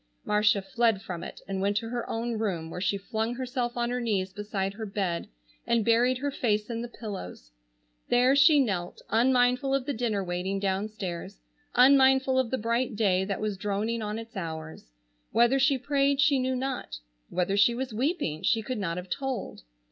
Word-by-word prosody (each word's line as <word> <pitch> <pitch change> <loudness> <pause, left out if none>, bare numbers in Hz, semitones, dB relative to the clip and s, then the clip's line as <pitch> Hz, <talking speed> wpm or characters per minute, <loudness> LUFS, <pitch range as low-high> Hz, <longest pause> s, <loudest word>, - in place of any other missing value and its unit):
Marcia 210 -1 +3
fled 235 -4 +1
from 175 -3 -6
it - - -9
and 195 -1 -3
went 200 +1 +1
to 225 +2 -2
her 240 0 -4
own 235 +1 -2
room, 170 -7 -2
where 180 - -5
she 200 +1 +1
flung 220 +3 -3
herself 250 -1 -3
on 240 0 0
her 250 0 -1
knees 195 -5 -1
beside 195 -1 -3
her 220 +2 -6
bed 195 -4 -2 0.4
and 235 -2 +2
buried 245 +2 +3
her 285 +2 -2
face 215 -4 0
in 230 0 -3
the 240 - -4
pillows. 195 - -8 0.6
There 250 +2 +4
she 295 +1 +6
knelt, 190 -9 -1
unmindful 250 +3 +3
of 270 -2 -1
the 285 - -1
dinner 220 -4 -1
waiting 180 +2 -2
downstairs, 195 -2 -3 0.4
unmindful 265 0 +5
of 255 -3 0
the 260 - -1
bright 230 +1 -1
day 190 -3 +2
that 195 0 -3
was 210 -2 -2
droning 210 +4 -2
on 210 0 -3
its 230 +1 -9
hours. 160 - -6 0.4
Whether 240 +4 +4
she 270 0 +3
prayed 275 +1 +1
she 285 -1 +4
knew 260 0 0
not, 255 - -3 0.3
whether 185 +2 0
she 220 +4 +4
was 255 -1 -4
weeping 235 - -1
she 225 -1 +2
could 250 +1 -3
not 170 -4 -2
have 180 +1 -6
told. 265 +3 -4
225 Hz, 185 wpm, -28 LUFS, 195-255 Hz, 0.6 s, she